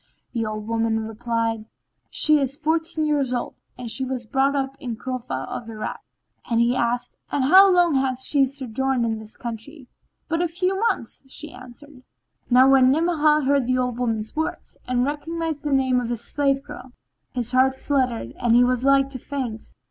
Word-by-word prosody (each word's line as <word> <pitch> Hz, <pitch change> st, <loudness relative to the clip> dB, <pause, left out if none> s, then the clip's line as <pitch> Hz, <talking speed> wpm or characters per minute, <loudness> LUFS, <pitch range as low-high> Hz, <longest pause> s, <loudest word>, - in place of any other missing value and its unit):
The 230 Hz, -3 st, -1 dB
old 215 Hz, 0 st, -5 dB
woman 225 Hz, -1 st, 0 dB
replied 225 Hz, 0 st, -2 dB, 0.4 s
"She 305 Hz, -1 st, +4 dB
is 270 Hz, -1 st, -1 dB
fourteen 320 Hz, 0 st, -1 dB
years 285 Hz, -4 st, +1 dB
old 245 Hz, -, -3 dB, 0.2 s
and 250 Hz, -, -6 dB
she 265 Hz, -, +1 dB
was 255 Hz, -2 st, -4 dB
brought 270 Hz, +4 st, +1 dB
up 270 Hz, -1 st, -2 dB
in 245 Hz, -5 st, -4 dB
Cufa 235 Hz, -, -4 dB
of 230 Hz, -, -6 dB
Irak." 215 Hz, -1 st, -5 dB, 0.5 s
He 235 Hz, +1 st, +2 dB
asked, 245 Hz, 0 st, -1 dB
"And 280 Hz, -, +1 dB
how 380 Hz, +8 st, +8 dB
long 350 Hz, -3 st, +4 dB
hath 265 Hz, -2 st, 0 dB
she 270 Hz, +1 st, +3 dB
sojourned 265 Hz, -1 st, -2 dB
in 225 Hz, -1 st, -2 dB
this 220 Hz, 0 st, -11 dB
country?" 245 Hz, +4 st, -8 dB, 0.4 s
"But 330 Hz, +1 st, 0 dB
a 350 Hz, -, +2 dB
few 365 Hz, +3 st, -1 dB
months," 230 Hz, -, -4 dB, 0.3 s
answered 255 Hz, +3 st, -12 dB
she. -, -, -24 dB, 0.5 s
Now 255 Hz, +1 st, +6 dB
when 260 Hz, -1 st, +6 dB
Ni'amah 305 Hz, 0 st, +3 dB
heard 275 Hz, -2 st, +2 dB
the 255 Hz, 0 st, +2 dB
old 250 Hz, -1 st, -1 dB
woman's 225 Hz, -3 st, -2 dB
words 315 Hz, +1 st, -4 dB
and 250 Hz, 0 st, +1 dB
recognised 315 Hz, +1 st, -3 dB
the 295 Hz, -, -3 dB
name 260 Hz, -2 st, +2 dB
of 235 Hz, -, -4 dB
his 240 Hz, -2 st, -3 dB
slave 275 Hz, -1 st, 0 dB
girl, 290 Hz, -4 st, -11 dB, 0.4 s
his 245 Hz, -1 st, -2 dB
heart 260 Hz, +1 st, +3 dB
fluttered 255 Hz, -, -1 dB
and 235 Hz, -1 st, +3 dB
he 245 Hz, -, +6 dB
was 250 Hz, 0 st, +1 dB
like 275 Hz, 0 st, +4 dB
to 265 Hz, -2 st, -7 dB
faint. 245 Hz, -5 st, -5 dB
260 Hz, 180 wpm, -23 LUFS, 235-285 Hz, 0.5 s, how